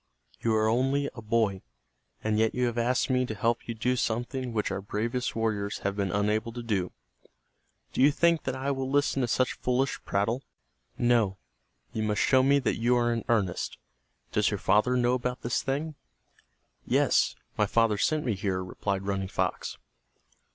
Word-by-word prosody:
"You 115 Hz, -1 st, +1 dB
are 110 Hz, 0 st, +3 dB
only 135 Hz, +5 st, +1 dB
a 115 Hz, -, -9 dB
boy, 110 Hz, -3 st, +1 dB, 0.6 s
and 110 Hz, 0 st, +1 dB
yet 110 Hz, 0 st, +2 dB
you 125 Hz, 0 st, +1 dB
have 120 Hz, -1 st, -1 dB
asked 120 Hz, +1 st, +1 dB
me 130 Hz, 0 st, +3 dB
to 110 Hz, -, -4 dB
help 115 Hz, +3 st, 0 dB
you 115 Hz, -, -3 dB
do 125 Hz, +3 st, 0 dB
something 120 Hz, +2 st, -2 dB
which 105 Hz, -2 st, -1 dB
our 100 Hz, -, -2 dB
bravest 115 Hz, +5 st, -2 dB
warriors 105 Hz, -2 st, -1 dB
have 100 Hz, 0 st, 0 dB
been 100 Hz, -2 st, -1 dB
unable 105 Hz, +3 st, 0 dB
to 120 Hz, 0 st, -6 dB
do. 100 Hz, -6 st, -1 dB, 1.0 s
Do -, -, 0 dB
you 140 Hz, +3 st, +7 dB
think 170 Hz, +2 st, +3 dB
that 130 Hz, -, -1 dB
I 135 Hz, +2 st, -1 dB
will 135 Hz, -1 st, -2 dB
listen 140 Hz, -1 st, +2 dB
to 125 Hz, -, +1 dB
such 130 Hz, +2 st, +1 dB
foolish 125 Hz, +2 st, 0 dB
prattle? 110 Hz, +6 st, 0 dB, 0.6 s
No. 115 Hz, -5 st, +2 dB, 0.6 s
You 110 Hz, -, -2 dB
must 105 Hz, -1 st, 0 dB
show 130 Hz, -1 st, +5 dB
me 140 Hz, +2 st, +4 dB
that 140 Hz, -, 0 dB
you 120 Hz, +2 st, +2 dB
are 120 Hz, -1 st, +2 dB
in 115 Hz, -, -2 dB
earnest. 100 Hz, -7 st, 0 dB, 0.5 s
Does -, -, +2 dB
your -, -, -2 dB
father 105 Hz, +6 st, +3 dB
know 120 Hz, 0 st, +2 dB
about 125 Hz, 0 st, -2 dB
this 120 Hz, -, 0 dB
thing!" 145 Hz, +4 st, -2 dB, 0.9 s
"Yes, -, -, +2 dB, 0.2 s
my 105 Hz, -, +2 dB
father 115 Hz, -1 st, +2 dB
sent 155 Hz, +4 st, +1 dB
me 120 Hz, -, +1 dB
here," 95 Hz, -2 st, -2 dB
replied 95 Hz, +1 st, -3 dB
Running 95 Hz, -1 st, -2 dB
Fox. -, -, -2 dB
115 Hz, 180 wpm, -28 LUFS, 105-125 Hz, 1.0 s, you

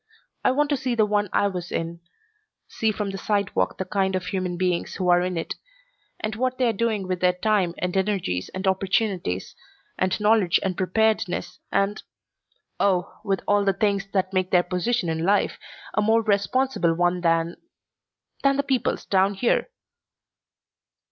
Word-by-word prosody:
I -, -, +4 dB
want 290 Hz, +3 st, +1 dB
to 285 Hz, -, +2 dB
see 255 Hz, -2 st, -1 dB
the 220 Hz, -2 st, +4 dB
one 205 Hz, -1 st, 0 dB
I 200 Hz, -, +2 dB
was 180 Hz, -3 st, -5 dB
in, 165 Hz, +1 st, -3 dB, 0.7 s
see 220 Hz, -1 st, 0 dB
from 205 Hz, -1 st, -3 dB
the 195 Hz, -, -6 dB
sidewalk 200 Hz, 0 st, 0 dB
the 190 Hz, -, -3 dB
kind 190 Hz, -1 st, 0 dB
of 185 Hz, -1 st, -2 dB
human 180 Hz, -2 st, -2 dB
beings 180 Hz, -1 st, -1 dB
who 185 Hz, -2 st, -1 dB
are 175 Hz, 0 st, +5 dB
in 180 Hz, -1 st, -2 dB
it, 165 Hz, -, -3 dB, 0.7 s
and 215 Hz, 0 st, -3 dB
what 255 Hz, +2 st, -1 dB
they 255 Hz, -, +2 dB
are 230 Hz, -, +2 dB
doing 215 Hz, -3 st, -1 dB
with 185 Hz, -1 st, -2 dB
their 180 Hz, 0 st, +3 dB
time 185 Hz, -2 st, +1 dB
and 180 Hz, 0 st, -2 dB
energies 190 Hz, -, -1 dB
and 185 Hz, +1 st, -5 dB
opportunities 190 Hz, -, 0 dB, 0.4 s
and 185 Hz, +2 st, +1 dB
knowledge 210 Hz, -4 st, +3 dB
and 190 Hz, -2 st, -1 dB
preparedness 185 Hz, -2 st, 0 dB
and 200 Hz, +1 st, +1 dB, 0.8 s
oh, 185 Hz, -3 st, +1 dB
with 195 Hz, -2 st, 0 dB
all 205 Hz, 0 st, +3 dB
the 195 Hz, -1 st, +2 dB
things 200 Hz, 0 st, 0 dB
that 190 Hz, -1 st, 0 dB
make 185 Hz, -1 st, +1 dB
their 180 Hz, -1 st, +4 dB
position 180 Hz, +4 st, -1 dB
in 160 Hz, 0 st, -1 dB
life 200 Hz, +3 st, +1 dB, 0.3 s
a 210 Hz, -, +2 dB
more 225 Hz, +2 st, +3 dB
responsible 205 Hz, -2 st, +1 dB
one 175 Hz, +1 st, +1 dB
than 165 Hz, 0 st, +1 dB, 0.8 s
than 275 Hz, 0 st, +3 dB
the 280 Hz, -, +1 dB
people's 265 Hz, -3 st, -1 dB
down 195 Hz, +1 st, +2 dB
here." 235 Hz, -, +1 dB
195 Hz, 170 wpm, -24 LUFS, 180-215 Hz, 0.8 s, are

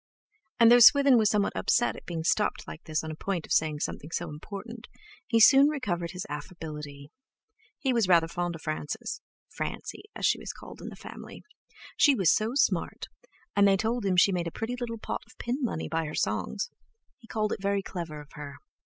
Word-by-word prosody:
And 230 Hz, 0 st, +7 dB
though 245 Hz, -, +8 dB
Swithin 275 Hz, +2 st, +8 dB
was 215 Hz, -2 st, +3 dB
somewhat 210 Hz, -2 st, +1 dB
upset 240 Hz, -, +2 dB
at -, -, -12 dB
being 165 Hz, -2 st, -3 dB
stopped 210 Hz, +5 st, 0 dB
like 160 Hz, -, -9 dB
this 155 Hz, -1 st, -2 dB
on 160 Hz, -, -5 dB
the -, -, -6 dB
point 180 Hz, 0 st, -3 dB
of -, -, -15 dB
saying 155 Hz, -2 st, +1 dB
something 150 Hz, -, -4 dB, 0.2 s
important, 210 Hz, +9 st, -9 dB, 0.4 s
he 230 Hz, -, +3 dB
soon 275 Hz, +5 st, +8 dB
recovered 185 Hz, -, -2 dB
his 180 Hz, +1 st, -6 dB
affability. 150 Hz, -2 st, -8 dB, 0.7 s
He 265 Hz, -2 st, 0 dB
was 230 Hz, -5 st, +2 dB
rather 170 Hz, -3 st, +5 dB
fond 175 Hz, 0 st, -3 dB
of 160 Hz, -, -11 dB
Frances—Francie, 155 Hz, -, -6 dB
as -, -, -2 dB
she -, -, +3 dB
was -, -, -6 dB
called -, -, -12 dB
in -, -, -6 dB
the -, -, -10 dB
family. -, -, -11 dB, 0.5 s
She 285 Hz, -3 st, +5 dB
was 190 Hz, -8 st, +4 dB
so 220 Hz, +2 st, 0 dB
smart, 280 Hz, -, 0 dB, 0.5 s
and 200 Hz, 0 st, +5 dB
they 195 Hz, -1 st, +4 dB
told 225 Hz, +3 st, -1 dB
him 190 Hz, -2 st, +1 dB
she 185 Hz, +2 st, +6 dB
made 175 Hz, -2 st, -1 dB
a -, -, -4 dB
pretty 225 Hz, +7 st, -4 dB
little 240 Hz, -2 st, -5 dB
pot -, -, -4 dB
of 225 Hz, -, -20 dB
pin 240 Hz, +2 st, -2 dB
money 230 Hz, -, -2 dB
by 165 Hz, 0 st, -1 dB
her 155 Hz, -, -6 dB
songs; -, -, -2 dB, 0.5 s
he 230 Hz, -, -17 dB
called 215 Hz, -2 st, -1 dB
it -, -, -6 dB
very 200 Hz, 0 st, 0 dB
clever 165 Hz, -6 st, -6 dB
of 145 Hz, -, -16 dB
her. 145 Hz, -2 st, -8 dB
195 Hz, 200 wpm, -28 LUFS, 160-230 Hz, 0.7 s, though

